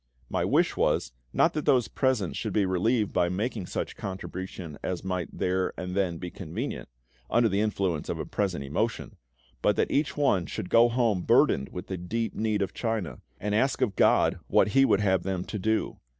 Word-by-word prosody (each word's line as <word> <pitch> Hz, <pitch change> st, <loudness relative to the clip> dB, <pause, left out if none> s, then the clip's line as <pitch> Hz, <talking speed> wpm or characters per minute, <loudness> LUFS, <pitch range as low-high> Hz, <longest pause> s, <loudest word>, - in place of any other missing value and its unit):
My -, -, 0 dB
wish -, -, +2 dB
was, -, -, +1 dB, 0.2 s
not -, -, +3 dB
that 150 Hz, -, -3 dB
those 125 Hz, -4 st, +4 dB
present 125 Hz, -8 st, 0 dB
should -, -, -3 dB
be 105 Hz, -2 st, +3 dB
relieved 105 Hz, +4 st, +1 dB
by 90 Hz, -1 st, +2 dB
making 105 Hz, +1 st, -2 dB
such -, -, -4 dB
contribution 95 Hz, -4 st, -6 dB
as 90 Hz, -2 st, -3 dB
might 90 Hz, -2 st, -2 dB
there 90 Hz, 0 st, -1 dB
and 90 Hz, 0 st, -4 dB
then 95 Hz, -3 st, 0 dB
be 90 Hz, +1 st, -6 dB
convenient, 95 Hz, -, -5 dB, 0.4 s
under 120 Hz, 0 st, +4 dB
the 100 Hz, -1 st, +1 dB
influence 95 Hz, -7 st, -1 dB
of -, -, -2 dB
a -, -, -4 dB
present 95 Hz, -8 st, -2 dB
emotion; 70 Hz, +1 st, -2 dB, 0.5 s
but -, -, +3 dB
that -, -, 0 dB
each 145 Hz, +2 st, 0 dB
one 100 Hz, -, +2 dB
should 90 Hz, -, -5 dB
go 120 Hz, +1 st, +6 dB
home 115 Hz, -6 st, +1 dB
burdened 70 Hz, -5 st, +3 dB
with 90 Hz, -, -7 dB
the 95 Hz, -, -4 dB
deep 110 Hz, +6 st, -3 dB
need 105 Hz, -2 st, 0 dB
of 95 Hz, -, -4 dB
China, 110 Hz, -7 st, -3 dB, 0.2 s
and 105 Hz, +1 st, -2 dB
ask 130 Hz, +6 st, +2 dB
of 110 Hz, -7 st, +1 dB
GOD -, -, +3 dB
what -, -, +4 dB
He 135 Hz, +6 st, +5 dB
would 100 Hz, -, +3 dB
have 95 Hz, -3 st, +2 dB
them 95 Hz, -1 st, -3 dB
to 105 Hz, -, -5 dB
do. 110 Hz, +3 st, -1 dB
100 Hz, 195 wpm, -27 LUFS, 90-115 Hz, 0.5 s, go